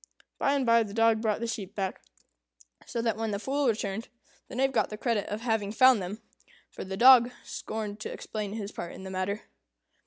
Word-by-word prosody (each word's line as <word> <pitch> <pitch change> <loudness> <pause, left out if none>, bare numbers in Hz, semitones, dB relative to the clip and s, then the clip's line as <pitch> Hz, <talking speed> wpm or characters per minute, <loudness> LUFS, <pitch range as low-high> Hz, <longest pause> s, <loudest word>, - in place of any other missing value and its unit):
By 275 - +2
and 275 -2 0
by 230 0 +5
the 210 -2 -4
dog 225 -1 +4
brought 220 -1 0
the - - -1
sheep 205 -3 -5
back; 190 -2 -3 0.9
so 235 - -3
that, 225 -2 0
when 225 0 -2
the 200 - -1
Fool 275 +6 0
returned, 215 -1 -1 0.4
the - - -9
Knave 270 +2 +2
got 245 - +1
the 210 - -6
credit 225 -3 -1
of 210 +2 -4
having 220 -4 0
found 255 0 +6
them; 205 +5 -6 0.5
for - - -7
the 190 0 -5
dog 245 +1 +8
scorned 215 -1 -5
to - - -5
explain 210 -2 -5
his 210 -2 -5
part 170 - -6
in - - -10
the 190 - -7
matter. 190 +3 -2
220 Hz, 210 wpm, -28 LUFS, 205-235 Hz, 0.9 s, dog